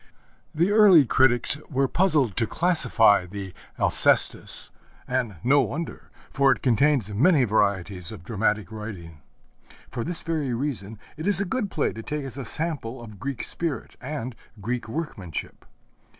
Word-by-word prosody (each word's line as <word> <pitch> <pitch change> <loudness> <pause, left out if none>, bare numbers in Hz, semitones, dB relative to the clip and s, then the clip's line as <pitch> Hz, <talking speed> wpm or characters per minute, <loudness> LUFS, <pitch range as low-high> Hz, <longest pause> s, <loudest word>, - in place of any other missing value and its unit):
The 170 +6 +2
early 200 -8 +7
critics 125 +3 +3
were 135 -1 +1
puzzled 150 - +1
to 115 - 0
classify 120 - +2
the 95 -1 -7 0.2
Alcestis, - - +3 0.4
and 125 -5 -2
no 140 +3 +4
wonder, 140 +7 -5 0.2
for 135 0 +3
it 120 - -2
contains 125 -3 +2
many 145 - +4
varieties 100 -5 0
of 100 -6 -10
dramatic 105 0 -1
writing. 95 -8 -9 0.7
For 120 -2 -4
this 175 +4 0
very 150 -7 -2
reason 115 -6 -4 0.2
it 155 - -5
is 200 -2 +7
a 200 - 0
good 205 +2 -2
play 155 - -1
to 115 - -8
take 150 +4 -4
as 135 0 -7
a 135 - -5
sample 135 -4 -3
of 110 -4 -12
Greek 135 +1 -4
spirit 165 -4 -3
and 130 -3 -5 0.2
Greek 120 +3 -4
workmanship. 110 - -6
125 Hz, 150 wpm, -24 LUFS, 105-150 Hz, 0.7 s, early